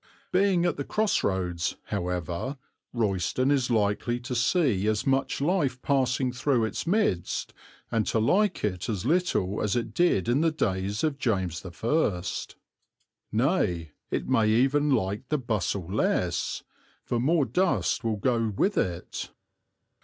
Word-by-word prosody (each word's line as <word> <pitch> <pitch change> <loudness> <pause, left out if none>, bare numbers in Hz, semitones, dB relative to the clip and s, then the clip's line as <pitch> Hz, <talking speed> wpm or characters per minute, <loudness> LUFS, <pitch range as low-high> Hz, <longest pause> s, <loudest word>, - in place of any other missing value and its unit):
Being 185 -2 +3
at 175 - 0
the 140 - -2
cross 215 +7 +1
roads, 90 -3 -1
however, 90 - -3 0.3
Royston 115 +4 0
is 135 -3 +2
likely 110 +2 +1
to 125 +1 -5
see 120 - +2
as 110 -1 0
much 135 0 +1
life 145 -5 +1
passing 130 -2 +1
through 125 -2 +1
its 110 - -4
midst 180 - 0 0.4
and 115 -2 +1
to - - +1
like 195 - +2
it 95 +1 -2
as 105 -4 -2
little 140 - +1
as 105 +1 0
it 120 - -2
did 175 - +2
in 125 +5 +2
the 165 - +4
days 100 -8 -1
of 150 -3 0
James 95 -9 -1
I. 95 - 0 1.1
Nay, 110 - +1 0.2
it - - -2
may 115 -5 +3
even 135 +6 +3
like 110 -1 0
the 150 - +2
bustle 105 - -2
less, 90 -2 -1 0.4
for 120 - -1
more 145 +4 +3
dust 175 - +1
will 110 -2 0
go 115 0 +1
with 205 - +2
it. 90 -1 -3
120 Hz, 145 wpm, -27 LUFS, 95-140 Hz, 1.1 s, the